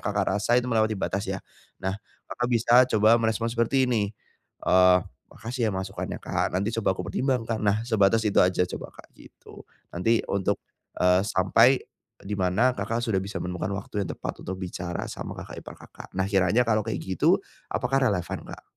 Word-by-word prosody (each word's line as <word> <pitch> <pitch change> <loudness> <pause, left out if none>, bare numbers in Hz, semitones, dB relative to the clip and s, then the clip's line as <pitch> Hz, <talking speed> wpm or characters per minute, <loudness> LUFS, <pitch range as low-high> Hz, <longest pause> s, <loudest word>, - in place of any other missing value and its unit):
Kakak 100 -1 0
rasa 120 +4 +2
itu 125 - +2
melewati 110 -1 +2
batas 100 +1 -2
ya. - - -1 0.5
Nah 95 +2 -1 0.3
Kakak 120 0 -2
bisa 120 +1 +5
coba 110 +3 +5
merespon 115 +1 0
seperti 120 +3 +2
ini. 105 -4 +1 0.6
Eee, 90 0 +6 0.3
"Makasih 115 -1 -3
ya - - 0
masukannya 95 0 -4
Kak - - -1
nanti 100 +4 0
coba 95 -3 +1
aku - - -4
pertimbangkan." 115 0 -1
Nah 105 +1 +1
sebatas 110 -1 +3
itu 105 - +2
aja 90 0 +3 0.2
coba - - -8
Kak - - -16
gitu. - - -15 0.2
Nanti 110 +7 +1
untuk, 100 -2 0 0.4
eee, 90 +1 +5
sampai 115 +6 +4 0.4
di 100 +1 -4
mana 95 +7 +3
Kakak 115 +4 -2
sudah 110 -5 0
bisa 100 +2 -4
menemukan 90 +2 -3
waktu 100 0 -3
yang - - -9
tepat - - -6
untuk 95 - -3
bicara 90 -2 -5
sama - - -6
kakak - - -9
ipar - - -10
Kakak. - - -13
Nah 95 +1 0
kiranya 100 +5 +3
kalau 110 -2 +2
kayak 110 - -3
gitu 95 -1 +2 0.3
apakah 135 +2 0
relevan 90 -6 -2
Kak? - - -10
105 Hz, 180 wpm, -26 LUFS, 95-115 Hz, 0.6 s, Eee